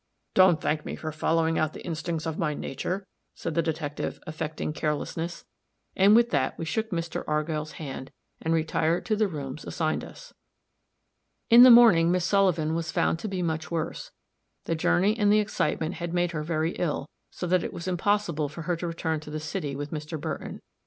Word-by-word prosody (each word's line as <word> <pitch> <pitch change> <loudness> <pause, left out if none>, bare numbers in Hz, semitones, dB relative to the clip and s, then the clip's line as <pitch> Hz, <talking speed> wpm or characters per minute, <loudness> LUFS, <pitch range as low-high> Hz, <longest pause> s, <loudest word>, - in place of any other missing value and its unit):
"Don't 185 -4 +6
thank 150 0 -1
me - - -5
for 155 - -5
following 160 +1 +1
out 155 -1 0
the - - -10
instincts 165 -1 -3
of 160 -1 -3
my 150 -3 0
nature," 185 +9 -4 0.3
said 165 - -4
the 170 - +2
detective, 155 -3 -3
affecting 155 0 -4
carelessness; 160 +3 -3 0.5
and 200 +3 +6
with 235 0 +4
that 135 -3 0
we 165 - -4
shook 220 +7 -2
Mr. 165 -3 -3
Argyll's 155 0 -1
hand, 135 -3 -7 0.3
and 160 - -1
retired 160 +1 +1
to 215 - +1
the 215 0 +2
rooms 145 -4 -6
assigned 155 -2 -1
us. - - -12 1.2
In 235 +1 +10
the 255 - +11
morning 225 -9 +7
Miss 180 -1 +1
Sullivan 185 -6 +2
was 165 0 -2
found 165 - +1
to 215 - -4
be 190 -3 -2
much 160 -1 -2
worse; 165 -2 -3 0.6
the - - 0
journey 180 +5 +2
and 205 -3 +3
the 210 - +5
excitement 185 -5 -1
had 170 0 -4
made 175 -1 +1
her 155 -3 -3
very 160 +1 -1
ill, 150 -5 -1 0.2
so - - -6
that 180 0 +2
it - - -4
was 170 - -7
impossible 180 -5 0
for 160 +3 -8
her 175 +2 0
to 175 - -4
return 160 -1 -2
to 150 - -11
the 155 +1 -4
city 150 -2 -4
with 145 +1 -5
Mr. 155 +1 -5
Burton. - - -5
165 Hz, 195 wpm, -27 LUFS, 155-180 Hz, 1.2 s, the